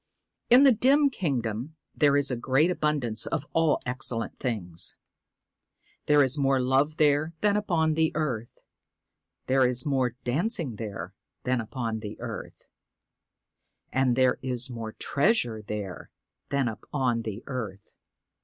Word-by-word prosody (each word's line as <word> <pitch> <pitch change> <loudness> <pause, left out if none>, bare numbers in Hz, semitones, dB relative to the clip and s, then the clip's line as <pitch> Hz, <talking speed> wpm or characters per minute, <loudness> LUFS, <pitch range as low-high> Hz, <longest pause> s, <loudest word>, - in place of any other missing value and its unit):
In 250 +3 +8
the 275 - +8
dim 275 +5 +4
kingdom 130 - -3 0.2
there 145 -2 +4
is 145 -1 +2
a - - 0
great 130 +8 +2
abundance 145 -10 -1
of 150 -3 -2
all 165 -2 +3
excellent 125 -2 -1
things. 90 -9 -1 1.1
There 150 -1 +6
is 135 +2 +2
more 135 -1 +2
love 135 +4 +1
there 150 +1 +2
than 205 -1 +3
upon 170 -7 +1
the 160 0 +2
earth; 125 -8 -3 0.8
there 130 0 +3
is 125 0 +3
more 130 -4 0
dancing 145 - -1
there 100 -5 -6 0.3
than 125 -1 0
upon 115 0 -4
the 105 -1 -8
earth; - - -7 1.3
and 130 -2 +2
there 130 0 +3
is 125 0 -2
more 115 -2 -6
treasure 140 - 0
there 105 -3 -6 0.4
than 140 -2 +1
upon 120 +1 -2
the 110 0 -6
earth. 110 -6 -6
130 Hz, 135 wpm, -27 LUFS, 115-150 Hz, 1.3 s, In